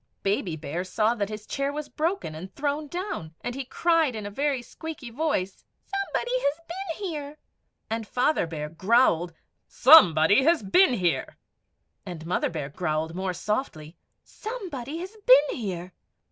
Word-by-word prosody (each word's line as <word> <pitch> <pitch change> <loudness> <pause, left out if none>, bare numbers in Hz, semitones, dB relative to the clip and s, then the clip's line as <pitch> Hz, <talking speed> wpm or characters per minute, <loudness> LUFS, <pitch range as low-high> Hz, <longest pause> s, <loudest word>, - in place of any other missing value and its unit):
Baby 195 -4 0
Bear 160 +3 -4
saw 215 +4 +1
that 205 -4 -2
his 215 0 -7
chair 275 0 -2
was 300 0 -5
broken 330 - -2
and 170 +5 -8
thrown 295 +1 -2
down, 350 - -5
and 245 - -4
he 270 +2 -4
cried 320 0 +1
in 215 -2 -5
a 205 - -5
very 275 +2 -1
squeaky 300 -1 -8
voice, 230 -9 -2 0.2
"SOMEBODY 395 +5 -2
HAS 285 -6 0 0.4
BEEN 400 - -4
HERE;" 295 -1 -6 0.5
and 225 -1 -3
Father 250 - +1
Bear 150 -2 -5
growled, 175 -1 +2 0.3
"SOMEBODY 200 - +7
HAS 330 -3 +3
BEEN 265 - +5
HERE;" 180 -5 -1 0.7
And 175 -5 -8
Mother 175 - 0
Bear 150 -5 -4
growled, 160 0 -2
more 185 0 -3
softly, 175 - -3 0.3
"SOMEBODY 340 - -6
HAS 380 +5 -8
BEEN 280 +3 +6
HERE." 185 -4 -5
230 Hz, 150 wpm, -26 LUFS, -, 0.7 s, SOMEBODY